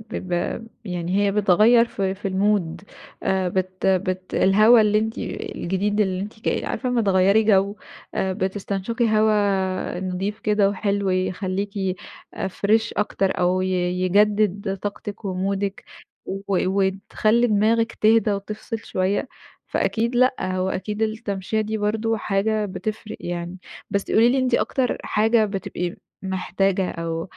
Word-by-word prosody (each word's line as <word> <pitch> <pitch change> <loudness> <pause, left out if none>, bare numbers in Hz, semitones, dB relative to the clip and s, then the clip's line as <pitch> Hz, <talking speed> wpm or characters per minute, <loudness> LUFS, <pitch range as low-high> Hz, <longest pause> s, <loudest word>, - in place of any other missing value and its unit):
ب - - -8
ب 180 +5 -3 0.2
يعني 180 0 -2
هي 200 -1 +2
بتغيّر 210 +4 +5
في 195 -4 -2
في 195 +1 -4
المود 190 -3 0 0.4
آآ 190 -1 +1
بت 185 +1 -2
بت 185 -1 0
الهوا 215 +5 +6
اللي 210 0 +3
أنتِ 220 +1 -2
الجديد 200 +4 -2
اللي 190 -2 +1
أنتِ 210 +2 -7
ك - - 0
عارفة 255 - -2
أمّا 245 -2 +1
تغيّري 195 +2 +4
جو 200 -1 +3 0.4
آآ 190 0 0
بتستنشقي 200 +4 -2
هوا 195 -4 +1
نضيف 190 +3 -3
كده 210 -2 +2
وحلو 200 -1 -1
يخلّيكِ 185 +2 -1 0.6
آآ، 190 - -2
فريش 220 +4 +1
أكتر 195 -2 0
أو 180 +1 +2
ي 185 - -1 0.3
يجدد 200 +1 +2
طاقتِك 205 0 -6
ومودِك 195 +1 -2 0.4
و 195 +1 -4 0.3
وتخلّي 200 +4 +1
دماغِك 225 +2 +2
تهدى 220 0 +3
وتفصل 210 +3 -5
شوية. 195 +1 -1 0.4
فأكيد 235 +2 0
لأ، 255 +1 +4
هو 185 0 -1
أكيد 210 +3 -3
التمشية 215 -1 -2
دي 215 +1 -2
برضه 220 +2 0
حاجة 210 +1 0
بتفرق 215 +2 -5
يعني. 175 +1 -5 0.3
بس 200 0 -2
قولي 230 +2 +5
لي 265 +2 +2
أنتِ 255 -2 +1
أكتر 255 0 0
حاجة 220 +1 +3
بتبقي 190 -3 -4 0.3
محتاجة 190 0 0
أو 165 0 -3
200 Hz, 135 wpm, -23 LUFS, 190-215 Hz, 0.6 s, الهوا